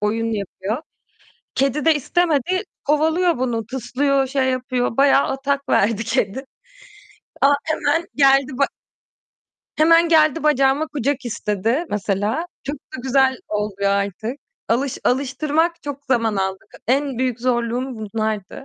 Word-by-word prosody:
oyun 225 +2 0
yapıyor. 205 - -4 0.7
Kedi 275 +3 0
de 325 -1 +5
istemedi 350 - +1 0.2
kovalıyor 320 +2 +2
bunu, 230 -4 -1
tıslıyor, 265 +2 0
şey 265 -1 0
yapıyor, 250 -2 -1
bayağı 275 0 +5
atak 275 +1 -2
verdi 220 +2 +2
kedi. 235 +2 -1 1.0
A - - +6 0.2
hemen 315 +1 0
geldi 275 -1 +4
ba 280 - +4 1.1
hemen 330 +2 +5
geldi 315 -1 +4
bacağıma 280 0 +3
kucak 285 -2 -2
istedi, 230 - -1
mesela. 210 - -1 0.2
Çok 285 +2 -3
da 260 -1 -10
güzel 265 0 +3
oluyor 205 -1 -1
artık. 200 +6 -2 0.3
Alış 255 +3 0
alıştırmak 290 +6 0
çok 285 -1 -6
zaman 230 -5 +1
aldı. 190 0 -1 0.3
En 270 0 +1
büyük 250 -2 -1
zorluğum 245 +1 -1
bunlardı. 215 +1 -4
265 Hz, 120 wpm, -21 LUFS, 225-285 Hz, 1.1 s, A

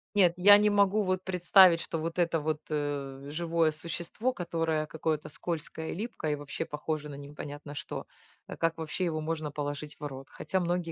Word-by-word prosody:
Нет, 180 -4 +6
я 205 +3 +8
не 210 0 +4
могу 205 +1 +3
вот 185 0 0
представить, 180 -1 +6
что 165 - -3
вот 165 +2 -3
это 165 -2 +2
вот, 155 0 -1
э, 140 -2 -3
живое 165 0 +1
существо, 170 +10 -3
которое 165 -5 -1
какое-то 155 0 -2
скользкое 160 0 -4
и - - -4
липкое, 200 -7 -3
и, - - 0
вообще, 145 +3 -5
похоже 150 0 -3
на 145 - -7
непонятно 145 +1 -8
что, - - -5 0.4
э, - - -6
как 165 0 +1
вообще 160 +3 -2
его 160 -2 -1
можно 155 -1 -3
положить 145 0 -4
в - - -4
рот. 135 -2 -7
Хотя 190 - -2
многие 175 -1 -1
160 Hz, 185 wpm, -30 LUFS, 150-175 Hz, 0.4 s, я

